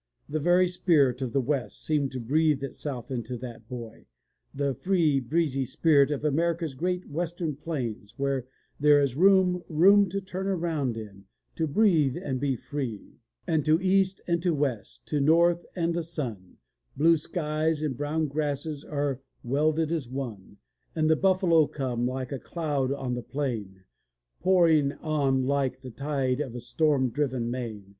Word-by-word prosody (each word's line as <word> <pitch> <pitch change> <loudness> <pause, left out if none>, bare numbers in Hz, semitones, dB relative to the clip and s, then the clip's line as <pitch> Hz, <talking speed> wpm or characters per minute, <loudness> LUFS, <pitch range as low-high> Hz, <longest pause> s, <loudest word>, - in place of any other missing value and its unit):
The 155 +2 -2
very 175 +4 +4
spirit 150 -8 +2
of 130 -3 -2
the 135 - +1
West 130 -1 -2
seemed 145 -3 0
to 130 - -3
breathe 145 +3 +1
itself 135 -2 -5
into 125 0 -4
that 120 -2 -9
boy, 120 -3 -8 0.4
the 140 -1 -1
free 160 -2 +2
breezy 135 +1 0
spirit 140 +2 +3
of 145 0 -2
America's 165 +1 0
great 180 +6 -2
western 165 0 -3
plains, 125 -9 -5
where 135 -2 -1 0.3
there 145 0 +6
is 140 -3 0
"room, 185 +1 +4
room 195 +5 +5
to 195 +3 -2
turn 190 0 -5
round 150 -8 -1
in, 100 -3 -9 0.3
to 160 - -1
breathe 160 - +3
and 130 -3 -3
be 135 -1 0
free,'' 125 -5 -6 0.3
^'And 155 -2 +1
to 155 +1 +4
east 190 0 +2
and 170 -1 0
to 175 -2 +1
west, 135 -7 -3
to 150 - 0
the - - +1
north 170 +3 +3
and 170 -2 0
the 170 - -1
sun, 125 - -6 0.4
Blue 165 +4 +5
skies 155 -1 -1
and 145 -4 -1
brown 150 +4 -1
grasses 145 0 -3
are 140 -3 -2 0.2
welded 155 +5 +1
as 155 -8 -2
one. 115 -7 -6 0.4
And 155 -1 +2
the - - +5
buffalo 180 -4 +3
come, 125 -3 -2
like 130 0 -4
a 135 - -3
cloud 145 -2 -2
on 135 -3 -2
the 125 - -3
plain. 115 -10 -4 0.6
Pouring 165 -6 +4
on 140 -4 0
like 130 -1 0
the 130 -2 -8
tide 135 -1 -1
of 130 -5 -5
a - - -4
storm 130 +1 +1
driven 130 -4 -1
main. 115 -5 -5
145 Hz, 165 wpm, -27 LUFS, 130-165 Hz, 0.6 s, there